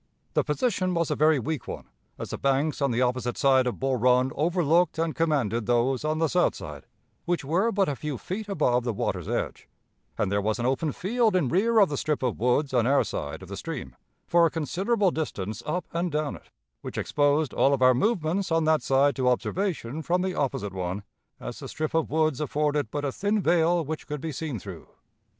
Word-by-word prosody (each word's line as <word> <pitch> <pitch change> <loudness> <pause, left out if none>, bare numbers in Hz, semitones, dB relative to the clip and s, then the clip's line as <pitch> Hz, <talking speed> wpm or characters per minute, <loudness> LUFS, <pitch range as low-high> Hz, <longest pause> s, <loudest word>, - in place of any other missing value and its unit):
The - - +2
position 185 - 0
was 170 -1 0
a - - +1
very 155 0 +4
weak 135 +2 -3
one, - - -6 0.3
as - - -6
the - - -4
banks 140 +3 +1
on 140 - +2
the 120 +1 +1
opposite 125 -1 -1
side 130 -2 +4
of 125 - -3
Bull 135 -1 0
Run 125 +2 +3
overlooked 170 +1 +2
and 165 -1 0
commanded 125 -9 0
those 120 +3 +1
on 155 +1 0
the 160 0 +2
south 180 +3 +2
side, - - -9 0.4
which 175 -5 -1
were 185 +10 +1
but 195 -2 +2
a 145 - -1
few 150 0 -4
feet 205 - -5
above 125 -10 +1
the 120 -2 -1
water's - - -2
edge, - - -3 0.5
and 95 - 0
there 100 0 +1
was 110 +2 0
an 120 - -2
open 135 +4 0
field 220 - +1
in 160 -9 +2
rear 225 - +2
of 200 -3 +6
the 145 - -3
strip 150 -1 -1
of 125 -3 -1
woods 125 +4 +1
on 120 -2 +3
our 140 +1 +4
side 75 +5 -5
of - - -10
the 100 - -6
stream, 160 +3 -6 0.3
for 170 -1 +4
a - - -2
considerable 190 - 0
distance 110 - -4
up 180 +4 -1
and 170 +1 -1
down 150 -1 -1
it, - - -16 0.3
which - - -7
exposed 145 0 +1
all 135 - +3
of 135 -2 +1
our 130 0 +7
movements 185 - 0
on 165 0 +3
that 155 0 +3
side 140 +1 +3
to 130 -2 +2
observation 155 - -1
from 180 +4 0
the 190 -1 -1
opposite 110 - -2
one, 95 +2 -3 0.4
as - - -7
the - - -7
strip 155 0 -3
of 160 -1 +1
woods 155 -2 +1
afforded 150 -3 0
but 145 +5 -3
a 140 - -1
thin 205 +8 0
veil 170 -2 +2
which 155 +2 -5
could 150 -1 -4
be 160 +3 -4
seen 145 -2 -4
through.... - - -9
150 Hz, 215 wpm, -26 LUFS, 130-170 Hz, 0.5 s, our